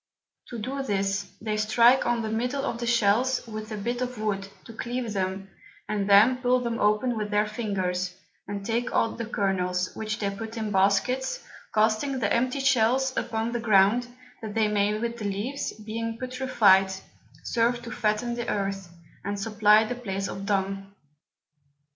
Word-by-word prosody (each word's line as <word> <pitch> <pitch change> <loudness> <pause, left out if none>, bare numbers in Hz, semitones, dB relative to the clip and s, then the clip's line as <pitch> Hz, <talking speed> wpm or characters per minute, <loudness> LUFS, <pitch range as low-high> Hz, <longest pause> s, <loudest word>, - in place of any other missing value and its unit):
To 240 - -7
do 265 +5 -3
this, 195 -4 -1
they 215 -1 -2
strike 235 +4 +4
on 235 -1 +1
the 220 - -3
middle 250 +5 -1
of 235 - -3
the 235 - -3
Shells 235 +3 +2
with 215 -1 -7
a 215 - -3
Bit 240 +4 -3
of 250 -1 -3
Wood 200 -2 -2 0.2
to 230 - -10
cleave 240 0 -4
them, 190 0 -3 0.4
and 205 -1 -1
then 215 +6 +6
pull 250 0 +2
them 235 -2 -3
open 210 +4 +2
with 210 -1 -3
their 210 0 +2
Fingers, 185 -5 -2 0.3
and 200 0 -5
take 235 +2 -1
out 230 - +1
the 230 - -3
Kernels, 185 -4 -1
which 215 -1 -3
they 200 -1 -1
put 220 +3 -7
in 215 -2 -3
Baskets, 210 - +1 0.3
casting 220 +6 +1
the 215 -5 0
empty 255 +3 +1
Shells 260 0 +2
upon 230 -1 -2
the 240 - -2
Ground, 220 +2 +4 0.3
that 215 -2 -6
they 220 -1 +3
may 210 0 +1
with 235 +1 -3
the 210 - -4
Leaves, 210 +8 -3
being 225 +1 -5
putrified, 235 -7 +3 0.5
serve 240 0 +1
to 235 - -7
fatten 220 +2 0
the 240 0 -4
Earth, 195 -3 -2 0.3
and 200 0 -3
supply 210 +1 +4
the 220 - -3
Place 195 -5 -4
of 195 0 -6
Dung. 195 -1 -2
220 Hz, 170 wpm, -26 LUFS, 200-240 Hz, 0.5 s, then